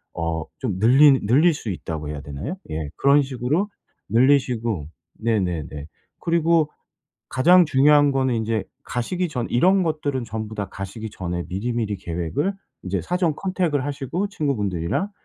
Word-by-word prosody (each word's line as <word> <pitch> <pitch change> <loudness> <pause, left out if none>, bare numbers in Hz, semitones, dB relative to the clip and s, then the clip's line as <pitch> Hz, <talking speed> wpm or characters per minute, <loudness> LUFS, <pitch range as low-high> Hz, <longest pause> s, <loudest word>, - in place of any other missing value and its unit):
어 80 -1 -2
좀 100 -8 -2
늘리 135 +5 +6
"늘릴 155 +9 +5
수 115 -7 -6
있다."고 80 -2 -5
해야 75 -2 -5
되나요? 75 - -5 0.2
예 75 -2 -3
그런 140 +1 +5
식으로 140 - -1 0.4
늘리시고 120 - +2 0.3
네네네. 90 -10 -1 0.4
그리고 165 -2 +2 0.6
가장 175 +7 +5
중요한 145 +1 +5
거는 130 -2 +1
인제 110 -1 -1 0.2
가시기 175 +10 -2
전 125 -5 -2
이런 185 +9 +4
것들은 145 -5 -1
전부 110 -1 -5
다 100 -3 -4
가시기 105 +3 -6
전에 90 -1 -4
미리미리 105 +1 -2
계획을 90 - -2 0.3
인제 95 0 -2
사전 175 -4 0
컨택을 175 -8 -1
하시고 145 +8 -3
친구분들이랑 115 - -1
125 Hz, 315 characters per minute, -23 LUFS, 95-150 Hz, 0.6 s, 늘리